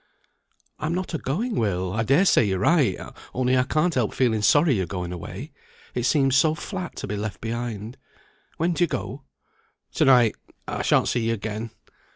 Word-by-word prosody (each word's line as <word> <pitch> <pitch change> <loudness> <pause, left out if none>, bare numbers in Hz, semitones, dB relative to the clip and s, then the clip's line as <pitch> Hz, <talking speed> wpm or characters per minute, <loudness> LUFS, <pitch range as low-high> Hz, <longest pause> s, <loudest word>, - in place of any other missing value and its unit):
"I'm 160 +3 -1
not 185 0 -3
a 160 - -1
going, 215 - -2
Will. 95 - -1
I 115 - 0
dare 135 - +3
say 180 - +5
you're 95 -3 0
right; 125 - +3 0.4
only 130 0 +2
I 130 - +4
can't 155 +6 +1
help 120 -5 0
feeling 115 -5 +2
sorry 145 +7 +4
you're 95 -6 -1
going 90 0 -4
away. 85 - -7 0.4
It 120 - -1
seems 135 -3 +3
so 155 +2 +4
flat 185 0 -6
to - - -5
be 105 - -3
left 105 0 -4
behind. 115 -1 -5 0.6
When 170 +2 +1
do 175 - +1
you - - +3
go?" 125 - -5 0.7
"To - - +2
night. 125 -4 +5 0.3
I - - -3
shan't - - +3
see 115 -2 0
you 115 - +1
again." 110 +1 -5
125 Hz, 190 wpm, -24 LUFS, 105-155 Hz, 0.7 s, say